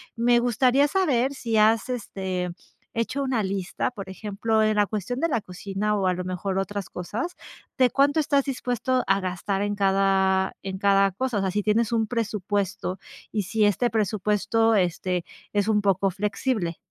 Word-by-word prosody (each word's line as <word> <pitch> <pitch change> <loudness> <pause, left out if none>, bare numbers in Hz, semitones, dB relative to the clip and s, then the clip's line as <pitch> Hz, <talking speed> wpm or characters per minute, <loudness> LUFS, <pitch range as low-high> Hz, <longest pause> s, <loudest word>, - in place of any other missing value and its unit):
me 240 +1 +3
gustaría 250 +4 +3
saber 280 -7 +1
si 230 -4 -2
has, 220 +2 +4
este, 190 -6 -3 0.4
hecho 230 +5 -1
una 255 -6 0
lista. 195 +4 -2
Por 200 -5 -8
ejemplo, 215 +2 -1
en 215 0 +2
la 205 -1 +3
cuestión 215 +5 -3
de 335 - +2
la 255 -7 0
cocina, 195 +3 -3
o 195 -2 +1
a 180 - +3
lo 180 - -4
mejor 185 +1 -3
otras 200 0 -3
cosas, 225 - -4 0.4
¿de 255 -2 +4
cuánto 285 +3 +3
estás 285 -2 +2
dispuesto 250 -1 -1
a 195 +1 +2
gastar 190 +2 -2
en 205 0 -1
cada 190 -1 +2
en 190 -1 -5
cada 195 -1 +4
cosa? 250 +2 -2
O - - +1
sea, 190 -1 0
¿sí 210 +2 0
tienes 215 +2 +1
un 225 -2 +1
presupuesto, 205 -4 -2 0.3
y 210 -2 -1
si 210 +3 +1
este 235 +4 +2
presupuesto, 215 +2 +1
este, 180 -1 0 0.3
es 205 0 +1
un 210 -1 +3
poco 195 -1 +2
flexible? 200 -1 -2
210 Hz, 175 wpm, -25 LUFS, 195-235 Hz, 0.4 s, has